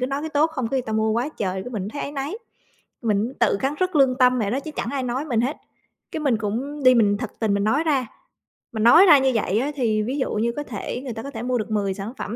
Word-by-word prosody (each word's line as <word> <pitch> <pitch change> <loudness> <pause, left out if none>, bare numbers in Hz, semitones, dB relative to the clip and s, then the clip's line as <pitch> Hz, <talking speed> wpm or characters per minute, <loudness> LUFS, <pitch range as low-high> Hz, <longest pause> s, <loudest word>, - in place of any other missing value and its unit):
cứ 255 - 0
nói 275 +2 -3
cái 315 - -4
tốt 295 +2 +3
không 255 -7 -3
cái 270 - 0
người - - -2
ta 220 - -5
mua 220 0 +1
quá 240 +6 0
trời, 190 -9 -3
cái 250 - -8
mình 205 -4 -4
thấy 285 +7 -6
áy 285 - -5
náy. 280 +6 -4 0.7
Mình 220 +2 0
tự - - +3
cắn 270 +2 0
rứt 370 -3 0
lương 265 -2 +4
tâm 250 0 +4
vậy 205 -4 -1
đó, 265 +5 -1
chứ 310 - -7
chẳng - - -2
ai 275 -2 -2
nói 255 +4 -2
mình 240 -7 0
hết, 260 +5 -1 0.6
cái 315 - -3
mình 270 -6 +2
cũng 250 +8 -4
đi, 255 - +7
mình 205 -4 +3
thật 235 - -5
tình 215 -3 +1
mình 200 0 0
nói 280 +9 +2
ra, 275 -6 +1 0.7
mình 220 0 -1
nói 330 +11 +8
ra 305 -6 +8
như 265 0 +2
vậy 215 -1 +1
á 285 +4 -1
thì 220 -5 +1
ví 260 +6 -3
dụ 260 - -1
như 230 +3 0
có 295 - -2
thể 245 0 -5
người 250 - -5
ta 225 0 -7
có 280 - -7
thể 225 -2 -6
mua 250 0 0
được 215 -1 -4
10 200 -2 0
sản 205 +4 -6
phẩm, 215 +3 -5
250 Hz, 295 wpm, -23 LUFS, 220-280 Hz, 0.7 s, nói